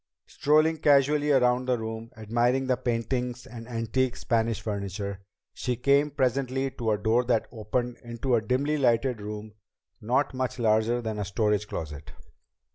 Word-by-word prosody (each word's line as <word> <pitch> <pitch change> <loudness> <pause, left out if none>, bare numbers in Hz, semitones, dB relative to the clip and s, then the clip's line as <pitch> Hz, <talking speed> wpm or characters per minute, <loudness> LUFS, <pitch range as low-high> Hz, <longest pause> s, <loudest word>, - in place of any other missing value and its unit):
Strolling 155 +2 +2
casually 145 0 +3
around 125 -1 +3
the 125 -1 +2
room, 110 0 -5
admiring 120 +4 +1
the 130 -1 +2
paintings 120 +1 -2
and 120 -3 -10
the - - -13
antique 120 +2 0
Spanish 115 -2 0
furniture, 100 -1 -4 0.3
she 125 - -2
came 140 +4 +3
presently 135 -1 0
to 115 -3 -3
a 105 - +2
door 110 +4 +2
that 120 -2 +1
opened 120 +2 -2
into 120 +2 -2
a 115 - +4
dimly 135 +6 0
lighted 120 -2 +2
room 105 +1 -7 0.5
not 125 +6 +1
much 130 -1 -2
larger 115 +1 +2
than 110 -1 -3
a - - -1
storage 105 0 0
closet. 75 -2 -6
120 Hz, 155 wpm, -27 LUFS, 110-130 Hz, 0.5 s, a